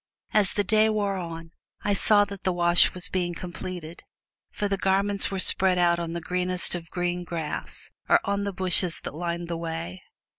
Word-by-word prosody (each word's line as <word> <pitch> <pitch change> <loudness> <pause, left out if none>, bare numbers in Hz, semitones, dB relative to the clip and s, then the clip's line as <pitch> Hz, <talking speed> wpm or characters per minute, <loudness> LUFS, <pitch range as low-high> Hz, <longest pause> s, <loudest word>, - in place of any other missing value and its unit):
As 210 -2 +4
the 205 - +1
day 215 +2 +3
wore 205 -2 0
on, 165 -2 -6 0.3
I 205 - +1
saw 205 +1 +4
that 200 -1 -9
the 185 - +1
wash 175 0 +4
was 180 +3 -1
being 175 -4 -2
completed, 175 -1 -7 0.5
for 205 - -2
the 200 - 0
garments 195 +1 +3
were 195 - -3
spread 185 0 +2
out 170 -1 +3
on 170 -1 -4
the 170 - -3
greenest 180 +1 -1
of 170 -1 -5
green 175 0 -2
grass, 165 -3 -5 0.2
or - - +6
on 200 0 -1
the 200 - -2
bushes 180 -2 +1
that - - -6
lined 170 +1 -3
the 170 -1 -3
way. 165 - -5
180 Hz, 190 wpm, -26 LUFS, 170-195 Hz, 0.5 s, or